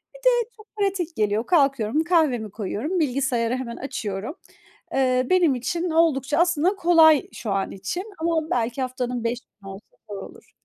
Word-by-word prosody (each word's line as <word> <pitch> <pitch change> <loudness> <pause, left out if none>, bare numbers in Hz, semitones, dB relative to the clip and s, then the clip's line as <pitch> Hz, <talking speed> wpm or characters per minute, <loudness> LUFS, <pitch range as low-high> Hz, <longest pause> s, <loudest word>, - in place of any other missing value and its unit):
Bir - - -12
de 485 -2 +2
çok 430 0 -16
pratik 390 -5 -1
geliyor. 215 +1 0
Kalkıyorum, 275 -4 +2
kahvemi 280 - +1
koyuyorum, 225 - -3
bilgisayarı 255 -5 0
hemen 250 -2 -5
açıyorum. 230 - -5 0.6
Eee, 255 -1 +2
benim 350 -7 +4
için 335 +8 -2
oldukça 300 -3 +2
aslında 345 +2 +2
kolay 330 -5 +5
şu 215 -4 -5
an 195 0 -1
için, 200 - -4 0.2
ama 320 -1 0
belki 240 +2 -1
haftanın 250 -2 -3
5 235 +1 -1
günü 200 -6 -15
olsa 195 +2 -11 0.2
da - - -6
olur. - - -16
270 Hz, 160 wpm, -24 LUFS, 235-335 Hz, 0.6 s, kolay